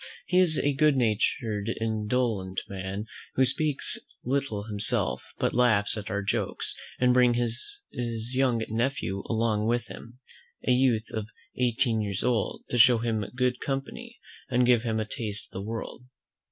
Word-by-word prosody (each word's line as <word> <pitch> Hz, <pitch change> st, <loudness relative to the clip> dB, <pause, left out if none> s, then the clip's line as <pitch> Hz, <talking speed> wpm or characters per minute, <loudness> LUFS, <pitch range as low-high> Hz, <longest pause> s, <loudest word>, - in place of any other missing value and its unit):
He 180 Hz, +1 st, +3 dB
is 170 Hz, -4 st, +4 dB
a 145 Hz, -, +2 dB
good 150 Hz, 0 st, +3 dB
natured 110 Hz, -1 st, 0 dB
indolent 110 Hz, -3 st, -1 dB
man, 95 Hz, +2 st, -5 dB, 0.3 s
who 130 Hz, -, +5 dB
speaks 150 Hz, +1 st, +1 dB, 0.2 s
little 125 Hz, -5 st, -1 dB
himself, 105 Hz, -1 st, 0 dB, 0.2 s
but -, -, 0 dB
laughs 110 Hz, -5 st, +3 dB
at 105 Hz, -1 st, -5 dB
our 100 Hz, 0 st, -1 dB
jokes; 100 Hz, -, -1 dB, 0.3 s
and 125 Hz, 0 st, +4 dB
brings 125 Hz, -1 st, +4 dB, 0.5 s
his 115 Hz, 0 st, -3 dB
young 125 Hz, -3 st, +2 dB
nephew 115 Hz, -3 st, -1 dB
along 110 Hz, -2 st, +1 dB
with 120 Hz, 0 st, +1 dB
him, 120 Hz, +2 st, -10 dB, 0.5 s
a -, -, +4 dB
youth 125 Hz, -3 st, +2 dB
of 110 Hz, -1 st, -3 dB, 0.3 s
eighteen 120 Hz, -2 st, +1 dB
years 100 Hz, -3 st, -2 dB
old, 120 Hz, -5 st, 0 dB
to 120 Hz, -, +1 dB
show 120 Hz, 0 st, +8 dB
him 110 Hz, -2 st, -1 dB
good 125 Hz, -1 st, +1 dB
company, 190 Hz, -, -4 dB, 0.3 s
and 125 Hz, -1 st, +3 dB
give 120 Hz, -2 st, +5 dB
him 110 Hz, -2 st, -1 dB
a 110 Hz, -, -1 dB
taste 105 Hz, -1 st, -4 dB
of -, -, -37 dB
the 95 Hz, -, -5 dB
world. 115 Hz, +2 st, -5 dB
115 Hz, 155 wpm, -27 LUFS, 110-125 Hz, 0.5 s, show